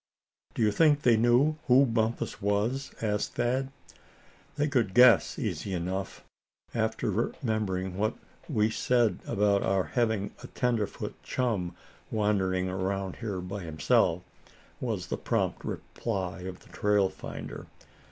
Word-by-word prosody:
"Do 115 Hz, -, +1 dB
you 105 Hz, -, +4 dB
think 145 Hz, +5 st, +4 dB
they 120 Hz, -2 st, +6 dB
knew 120 Hz, +7 st, +3 dB
who 130 Hz, +2 st, +6 dB
Bumpus 115 Hz, -1 st, -1 dB
was?" 105 Hz, +7 st, 0 dB
asked 105 Hz, -1 st, -1 dB
Thad. 130 Hz, +3 st, 0 dB, 0.8 s
"They 150 Hz, +1 st, +1 dB
could 120 Hz, -9 st, 0 dB
guess, 125 Hz, -1 st, +6 dB
easy 95 Hz, -2 st, -3 dB
enough, 95 Hz, +3 st, -4 dB, 0.5 s
after 110 Hz, -1 st, 0 dB
remembering 100 Hz, -4 st, -2 dB
what 110 Hz, +1 st, +1 dB, 0.3 s
we 110 Hz, +1 st, +2 dB
said 120 Hz, -1 st, +2 dB
about 100 Hz, 0 st, +2 dB
our 95 Hz, -1 st, +2 dB
having 110 Hz, -4 st, 0 dB
a -, -, -8 dB
tenderfoot 120 Hz, -5 st, -2 dB
chum 100 Hz, -9 st, -1 dB, 0.3 s
wandering 95 Hz, -4 st, +1 dB
around 95 Hz, 0 st, -2 dB
here 100 Hz, -5 st, -4 dB
by 95 Hz, +3 st, -5 dB
himself," 80 Hz, -2 st, +2 dB, 0.6 s
was -, -, -2 dB
the -, -, -3 dB
prompt -, -, -1 dB
reply 95 Hz, -6 st, -4 dB
of 95 Hz, -1 st, -7 dB
the -, -, -19 dB
trail 105 Hz, -1 st, +2 dB
finder. 95 Hz, -, -8 dB
105 Hz, 130 wpm, -29 LUFS, 95-120 Hz, 0.8 s, they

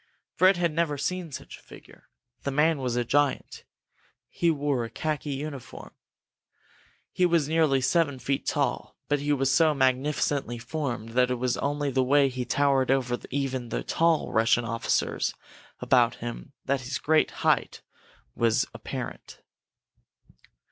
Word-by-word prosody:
Fred, 185 Hz, 0 st, +4 dB
had 170 Hz, -3 st, 0 dB
never 160 Hz, -3 st, 0 dB
seen 175 Hz, +3 st, -3 dB
such -, -, -9 dB
a -, -, -22 dB
figure. -, -, -16 dB, 0.3 s
The -, -, -3 dB
man 150 Hz, +2 st, +2 dB
was 125 Hz, -2 st, -2 dB
a 120 Hz, -1 st, 0 dB
giant. 145 Hz, +2 st, 0 dB, 0.6 s
He 170 Hz, -, 0 dB
wore 145 Hz, -5 st, 0 dB
a 115 Hz, -, -5 dB
khaki 150 Hz, +5 st, -3 dB
uniform. 140 Hz, -2 st, -7 dB, 1.2 s
He 180 Hz, -, +2 dB
was 165 Hz, -4 st, +2 dB
nearly 155 Hz, -4 st, +2 dB
seven 145 Hz, 0 st, +1 dB
feet 135 Hz, +3 st, -2 dB
tall, 145 Hz, -2 st, -1 dB
but 145 Hz, 0 st, +2 dB
he 145 Hz, +1 st, -1 dB
was 135 Hz, -2 st, +2 dB
so 155 Hz, +2 st, +4 dB
magnificently 135 Hz, -1 st, 0 dB
formed 120 Hz, -3 st, -4 dB
that 125 Hz, +2 st, +2 dB
it 125 Hz, -, 0 dB
was 125 Hz, 0 st, -1 dB
only 145 Hz, 0 st, -1 dB
the 130 Hz, 0 st, +2 dB
way 140 Hz, +2 st, +4 dB
he 125 Hz, -1 st, -4 dB
towered 135 Hz, -2 st, +2 dB
over 125 Hz, -2 st, +1 dB
even 130 Hz, -3 st, -2 dB
the -, -, -3 dB
tall 165 Hz, -1 st, +1 dB
Russian 115 Hz, +1 st, +3 dB
officers 115 Hz, +1 st, -1 dB, 0.5 s
about 120 Hz, -2 st, +3 dB
him 120 Hz, +3 st, -7 dB
that 140 Hz, 0 st, 0 dB
his 130 Hz, +1 st, -3 dB
great 155 Hz, +1 st, +2 dB, 0.2 s
height -, -, +1 dB, 0.5 s
was 115 Hz, -2 st, +2 dB
apparent. -, -, -7 dB
140 Hz, 150 wpm, -27 LUFS, 125-150 Hz, 1.2 s, Fred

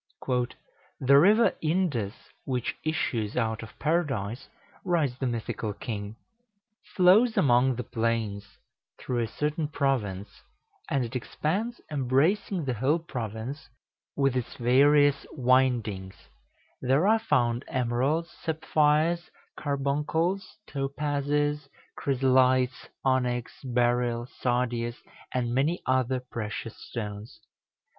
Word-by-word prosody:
"The 140 Hz, +1 st, +6 dB
River 210 Hz, +8 st, +5 dB
Indus, 155 Hz, -, 0 dB, 0.3 s
which 125 Hz, -3 st, -2 dB
issues 120 Hz, -10 st, -1 dB
out 110 Hz, -2 st, 0 dB
of 115 Hz, -, -11 dB
Paradise," 135 Hz, -, -1 dB, 0.3 s
writes 155 Hz, -8 st, +1 dB
the 130 Hz, -, 0 dB
mythical 115 Hz, -2 st, -3 dB
king, 105 Hz, -1 st, -5 dB, 0.8 s
"flows 200 Hz, +6 st, +5 dB
among 125 Hz, -1 st, +4 dB
the 125 Hz, -, -4 dB
plains, 110 Hz, -4 st, -2 dB, 0.4 s
through 125 Hz, -1 st, -2 dB
a 115 Hz, -, 0 dB
certain 150 Hz, +5 st, -2 dB
province, 115 Hz, -10 st, -2 dB, 0.5 s
and 135 Hz, -3 st, +1 dB
it 120 Hz, +3 st, -8 dB
expands, 195 Hz, -, -2 dB
embracing 150 Hz, +7 st, +1 dB
the 130 Hz, -, 0 dB
whole 130 Hz, +8 st, +2 dB
province 125 Hz, -2 st, -6 dB, 0.5 s
with 135 Hz, -2 st, +2 dB
its 125 Hz, -2 st, -3 dB
various 140 Hz, +3 st, +4 dB
windings: 120 Hz, -8 st, +1 dB, 0.7 s
there 135 Hz, +8 st, +3 dB
are 225 Hz, +1 st, +5 dB
found 120 Hz, -, +1 dB
emeralds, 130 Hz, +6 st, 0 dB
sapphires, 160 Hz, +1 st, +1 dB, 0.3 s
carbuncles, 150 Hz, +7 st, -1 dB
topazes, 145 Hz, +1 st, -1 dB, 0.3 s
chrysolites, 130 Hz, -1 st, +2 dB, 0.2 s
onyx, 125 Hz, -2 st, +1 dB
beryl, 120 Hz, -1 st, +1 dB
sardius, 120 Hz, -1 st, -1 dB, 0.3 s
and 120 Hz, -2 st, -1 dB
many 150 Hz, +7 st, +1 dB
other 130 Hz, 0 st, +1 dB
precious 115 Hz, -2 st, -6 dB
stones. 105 Hz, -1 st, -6 dB
130 Hz, 100 wpm, -27 LUFS, 120-150 Hz, 0.8 s, The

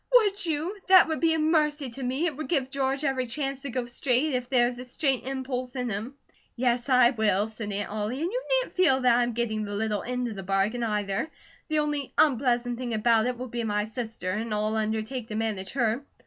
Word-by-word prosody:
"Would 410 Hz, -4 st, +4 dB
you? 320 Hz, +5 st, -1 dB
That 370 Hz, -3 st, +7 dB
would 315 Hz, -, -1 dB
be 325 Hz, -1 st, +3 dB
a -, -, 0 dB
mercy 305 Hz, -4 st, +1 dB
to 270 Hz, -, -8 dB
me; 260 Hz, +6 st, -1 dB
it 315 Hz, -5 st, -1 dB
would 305 Hz, -1 st, -5 dB
give 270 Hz, -5 st, 0 dB
George 275 Hz, +1 st, -1 dB
every 265 Hz, -3 st, 0 dB
chance 275 Hz, +2 st, -3 dB
to 280 Hz, -, -5 dB
go 250 Hz, 0 st, -2 dB
straight, 250 Hz, +4 st, +1 dB
if 250 Hz, -1 st, -2 dB
there 245 Hz, -2 st, +4 dB
is 245 Hz, 0 st, -5 dB
a -, -, -5 dB
straight 260 Hz, 0 st, -1 dB
impulse 260 Hz, -1 st, -4 dB
in 250 Hz, -2 st, -2 dB
him." 220 Hz, +7 st, -4 dB, 0.4 s
"Yes, 245 Hz, +1 st, 0 dB
I 250 Hz, -2 st, +6 dB
will," 215 Hz, -4 st, +2 dB
said 220 Hz, -1 st, -6 dB
Aunt 200 Hz, +1 st, -2 dB
Ollie, 215 Hz, +5 st, -2 dB
"and 350 Hz, -, -1 dB
you -, -, -2 dB
needn't -, -, -3 dB
feel 320 Hz, -8 st, +4 dB
that 250 Hz, -2 st, +5 dB
I -, -, +3 dB
am 240 Hz, 0 st, 0 dB
getting 220 Hz, -2 st, -1 dB
the 205 Hz, -1 st, -4 dB
little 210 Hz, -1 st, -1 dB
end 250 Hz, 0 st, -2 dB
of 225 Hz, -, -5 dB
the 195 Hz, -, -5 dB
bargain, 195 Hz, +5 st, 0 dB
either. 210 Hz, +3 st, -1 dB, 0.4 s
The 310 Hz, -, 0 dB
only 295 Hz, -2 st, -1 dB
unpleasant 245 Hz, -4 st, +2 dB
thing 240 Hz, -3 st, -2 dB
about 225 Hz, +1 st, +3 dB
it 250 Hz, -1 st, -2 dB
will 255 Hz, +1 st, -5 dB
be 235 Hz, 0 st, -3 dB
my 210 Hz, -1 st, 0 dB
sister, 220 Hz, -4 st, -4 dB
and 220 Hz, +3 st, -3 dB
I'll 215 Hz, +1 st, 0 dB
undertake 220 Hz, +3 st, -2 dB
to 215 Hz, -, -5 dB
manage 215 Hz, -4 st, -2 dB
her. 240 Hz, 0 st, 0 dB
245 Hz, 230 wpm, -27 LUFS, 220-275 Hz, 0.4 s, That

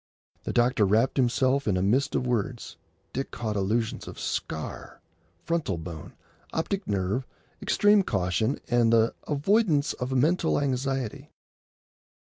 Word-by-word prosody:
The -, -, -2 dB
doctor 120 Hz, -2 st, +3 dB
wrapped 110 Hz, +8 st, +2 dB
himself 130 Hz, +2 st, +2 dB
in 95 Hz, -3 st, +2 dB
a 90 Hz, -, 0 dB
mist 130 Hz, +8 st, +1 dB
of 125 Hz, -, 0 dB
words. 120 Hz, 0 st, -2 dB, 0.4 s
Dick 135 Hz, -, -3 dB
caught 110 Hz, -3 st, -4 dB
allusions 110 Hz, +3 st, -1 dB
to -, -, -8 dB
"scar," 80 Hz, -1 st, -5 dB, 0.5 s
"frontal 165 Hz, -, -1 dB
bone," 80 Hz, -2 st, -8 dB, 0.4 s
"optic 190 Hz, +4 st, -2 dB
nerve," 100 Hz, +6 st, -1 dB, 0.3 s
"extreme 205 Hz, 0 st, +4 dB
caution," 95 Hz, -, 0 dB
and 120 Hz, -2 st, +3 dB
the 115 Hz, 0 st, +4 dB
"avoidance 155 Hz, 0 st, +2 dB
of 125 Hz, +1 st, -4 dB
mental 160 Hz, +6 st, +2 dB
anxiety." 135 Hz, -3 st, -2 dB
125 Hz, 125 wpm, -27 LUFS, 105-140 Hz, 0.5 s, extreme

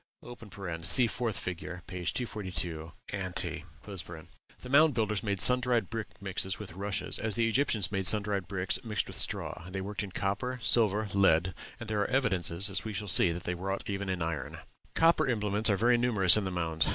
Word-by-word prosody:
(See 120 Hz, +9 st, +5 dB
4th 115 Hz, -2 st, -2 dB
fig., 90 Hz, -5 st, -4 dB, 0.3 s
p. 90 Hz, 0 st, -7 dB
242, 90 Hz, -8 st, -3 dB, 0.2 s
ante.) 95 Hz, -1 st, -3 dB, 0.2 s
The 85 Hz, +5 st, -10 dB
Mound 150 Hz, 0 st, +5 dB
Builders 110 Hz, -2 st, 0 dB
made 100 Hz, -4 st, -2 dB
sun 125 Hz, 0 st, +7 dB
dried 120 Hz, -5 st, 0 dB
brick 115 Hz, -2 st, -6 dB
mixed 95 Hz, -2 st, -2 dB
with 105 Hz, -5 st, -9 dB
rushes, 100 Hz, +2 st, 0 dB
as 110 Hz, -2 st, -1 dB
the 115 Hz, -1 st, +2 dB
Egyptians 115 Hz, -5 st, +1 dB
made 95 Hz, -2 st, -1 dB
sun 105 Hz, -1 st, +4 dB
dried 100 Hz, -3 st, -3 dB
bricks 95 Hz, -2 st, -1 dB
mixed 105 Hz, -6 st, -1 dB
with -, -, -8 dB
straw; 85 Hz, -, 0 dB
they 95 Hz, +1 st, -5 dB
worked 100 Hz, +1 st, -4 dB
in 105 Hz, -, -5 dB
copper, 105 Hz, +8 st, -3 dB
silver, 110 Hz, -2 st, +3 dB
lead, 95 Hz, -2 st, +3 dB, 0.3 s
and 115 Hz, -, -8 dB
there 105 Hz, -1 st, -1 dB
are -, -, -1 dB
evidences, 95 Hz, -7 st, +1 dB
as 95 Hz, -, -2 dB
we 110 Hz, -, -5 dB
shall 105 Hz, +1 st, -4 dB
see, 90 Hz, -1 st, +6 dB
that 85 Hz, +1 st, -6 dB
they 90 Hz, -, -2 dB
wrought 95 Hz, +2 st, -4 dB
even 100 Hz, -1 st, -4 dB
in 90 Hz, -3 st, -2 dB
iron. 80 Hz, -4 st, -4 dB, 0.4 s
Copper 165 Hz, -2 st, +3 dB
implements 105 Hz, -2 st, 0 dB
are 100 Hz, -, +2 dB
very 120 Hz, +3 st, +3 dB
numerous 105 Hz, -7 st, +5 dB
in 105 Hz, -2 st, 0 dB
the 95 Hz, -, -3 dB
mounds. 80 Hz, -3 st, -1 dB
100 Hz, 190 wpm, -30 LUFS, 90-110 Hz, 0.4 s, sun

